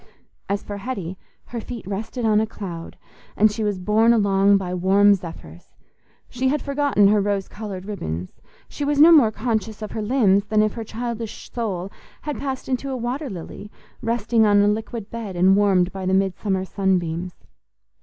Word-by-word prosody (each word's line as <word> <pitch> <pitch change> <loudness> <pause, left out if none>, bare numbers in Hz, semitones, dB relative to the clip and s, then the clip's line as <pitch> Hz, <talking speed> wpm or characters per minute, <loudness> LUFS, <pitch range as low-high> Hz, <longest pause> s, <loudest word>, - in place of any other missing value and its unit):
As 200 +1 -1
for 205 - -6
Hetty, 195 -5 -5 0.3
her 235 -2 -6
feet 235 -2 -8
rested 215 +5 -4
on 215 -1 +4
a 220 - -1
cloud, 175 -6 -8 0.4
and 215 +1 +5
she 220 +1 -3
was 205 -2 0
borne 215 +5 +3
along 200 -2 +4
by 185 -2 -4
warm 195 +3 +4
zephyrs; 165 - -8 0.5
she 255 +2 -2
had 295 +3 +1
forgotten 280 -8 +2
her 210 0 +3
rose 200 -1 -1
coloured 200 -4 -7
ribbons; 90 - -6 0.3
she 290 - -6
was 285 0 0
no 320 +3 +9
more 285 -9 +7
conscious 220 -1 -3
of 210 - -6
her 220 - -4
limbs 210 -4 +3
than 215 0 +2
if 215 - 0
her 230 - -5
childish 230 0 -6
soul 200 -5 -3 0.3
had 295 -1 -4
passed 270 -2 -4
into 265 +1 -2
a 260 - -2
water 255 +4 -3
lily, 190 +2 -8 0.3
resting 230 0 +1
on 205 -1 +5
a - - +3
liquid 220 0 -3
bed 225 -5 -6
and 185 +2 +5
warmed 190 -3 +3
by 190 -1 -5
the 190 - +2
midsummer 190 0 0
sun 190 -1 +1
beams. 175 +1 -4
210 Hz, 185 wpm, -22 LUFS, 190-230 Hz, 0.5 s, no